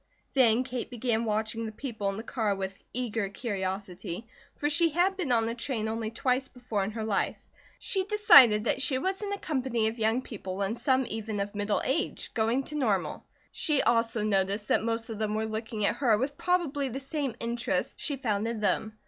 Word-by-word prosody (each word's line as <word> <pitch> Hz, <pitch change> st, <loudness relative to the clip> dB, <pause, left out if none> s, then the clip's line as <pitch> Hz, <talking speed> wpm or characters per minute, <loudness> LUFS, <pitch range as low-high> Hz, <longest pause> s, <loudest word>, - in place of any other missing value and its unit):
Then 245 Hz, -2 st, +4 dB
Kate 255 Hz, -2 st, -4 dB
began 235 Hz, -2 st, -1 dB
watching 220 Hz, +1 st, -1 dB
the -, -, -5 dB
people 220 Hz, -4 st, -3 dB
in 195 Hz, -, -4 dB
the 225 Hz, -, -5 dB
car 220 Hz, -5 st, -1 dB
with 195 Hz, 0 st, -5 dB
eager 225 Hz, -4 st, -2 dB
curiosity, 190 Hz, -2 st, -4 dB, 0.3 s
for 295 Hz, -, -1 dB
she 330 Hz, +3 st, +3 dB
had 355 Hz, +5 st, +2 dB
been 350 Hz, -9 st, -2 dB
on 225 Hz, -2 st, +3 dB
a 230 Hz, -, -1 dB
train 235 Hz, -2 st, -2 dB
only 220 Hz, 0 st, -2 dB
twice 255 Hz, +3 st, 0 dB
before 245 Hz, -6 st, -3 dB
in 195 Hz, -, -2 dB
her 220 Hz, 0 st, -4 dB
life. 210 Hz, -3 st, 0 dB, 0.4 s
She 385 Hz, -2 st, 0 dB
decided 285 Hz, -, +7 dB
that 255 Hz, -, +1 dB
she 265 Hz, -1 st, +2 dB
was 380 Hz, +9 st, -1 dB
in 410 Hz, -1 st, -3 dB
a 405 Hz, -, -1 dB
company 255 Hz, -, 0 dB
of 230 Hz, +1 st, -8 dB
young 225 Hz, +3 st, +2 dB
people 195 Hz, -4 st, -5 dB
and 200 Hz, +3 st, -1 dB
some 260 Hz, +2 st, +2 dB
even 220 Hz, -1 st, -4 dB
of 200 Hz, +1 st, -2 dB
middle 205 Hz, 0 st, 0 dB
age, 320 Hz, +6 st, -1 dB
going 230 Hz, +4 st, +1 dB
to 300 Hz, -, -6 dB
Normal. 200 Hz, -, 0 dB, 0.3 s
She 300 Hz, -4 st, +1 dB
also 230 Hz, -2 st, +2 dB
noticed 200 Hz, 0 st, 0 dB
that -, -, +3 dB
most 230 Hz, +1 st, -1 dB
of 215 Hz, -, -6 dB
them 215 Hz, -1 st, -1 dB
were 220 Hz, 0 st, 0 dB
looking 220 Hz, -1 st, -3 dB
at 210 Hz, -, +1 dB
her 235 Hz, -6 st, +3 dB
with 270 Hz, +5 st, -2 dB
probably 310 Hz, -7 st, 0 dB
the 260 Hz, +3 st, -4 dB
same 275 Hz, -3 st, -3 dB
interest 235 Hz, +1 st, -2 dB
she 290 Hz, -, -1 dB
found 220 Hz, -5 st, -1 dB
in 230 Hz, -1 st, -3 dB
them. 215 Hz, +1 st, 0 dB
230 Hz, 205 wpm, -29 LUFS, 215-265 Hz, 0.4 s, decided